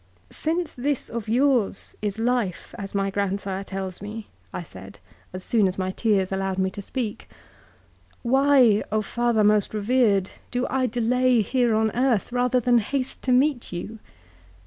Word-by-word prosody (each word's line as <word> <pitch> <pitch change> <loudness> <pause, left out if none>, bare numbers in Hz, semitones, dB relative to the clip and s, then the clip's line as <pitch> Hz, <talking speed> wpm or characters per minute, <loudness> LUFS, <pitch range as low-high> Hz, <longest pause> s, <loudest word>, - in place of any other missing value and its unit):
" - - -33
' - - -35 0.2
Since 335 +1 0
this 275 +2 -2
of 225 -2 -5
yours 245 -4 +1
is 205 -1 -2
life 230 -5 -1
as 195 0 -7
my 195 0 0
grandsire 195 -1 -2
tells 190 -2 -6
me,' 210 +1 -6 0.3
I 180 - -5
said 95 - -12 0.3
as 185 0 -7
soon 215 -2 +2
as 185 - -3
my 185 -1 -1
tears 195 -2 +1
allowed 190 0 -1
me 190 0 +1
to 200 - -7
speak, 225 0 -5 0.5
' - - -33
why, 265 -6 +5 0.2
father 235 0 +1
most 210 0 +2
revered, 210 -3 +2 0.2
do 245 +1 -1
I 260 -1 +1
delay 245 +1 +2
here 240 +1 +1
on 220 0 +2
earth, 245 -3 +1
rather 250 0 +2
than 245 0 +3
haste 260 +4 -3
to 255 - -1
meet 255 0 +2
you?' 210 +6 -6
220 Hz, 170 wpm, -24 LUFS, 195-250 Hz, 0.5 s, why